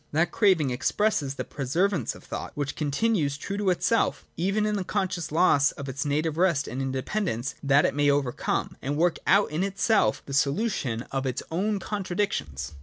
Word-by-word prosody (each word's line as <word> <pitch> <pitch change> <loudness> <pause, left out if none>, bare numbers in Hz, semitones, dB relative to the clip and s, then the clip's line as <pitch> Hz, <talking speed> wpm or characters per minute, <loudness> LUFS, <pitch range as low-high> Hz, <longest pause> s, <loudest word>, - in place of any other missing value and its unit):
That 160 +3 +2
craving 180 - +3
expresses 140 +1 0
the - - -3
persever 165 +9 0
ance 140 -10 -2
of - - -14
thought, - - -6
which 145 -2 -3
continues 150 -1 0
true 200 +7 -5
to 205 -2 +1
itself, 220 +5 +1
even 195 +5 0
in 210 0 0
this 190 -3 -3
conscious 185 -5 -2
loss 150 -4 +4
of 140 -2 -7
its 135 +2 -3
native 155 +2 0
rest 170 -7 +2
and 130 +3 -4
independ 135 +10 -2
ence, 120 +1 -2
' - - -35
that 140 +1 +4
it - - +1
may 145 0 +2
overcome 140 -3 -1
' - - -41
and 140 +2 -2
work 170 +1 +2
out 200 -3 +4
in 155 +3 -1
itself 195 - +1
the 140 - -7
solution 140 - 0
of 135 0 -1
its 125 - -3
own 200 +5 0
contradictions. 175 - -3
155 Hz, 195 wpm, -26 LUFS, 135-195 Hz, -, loss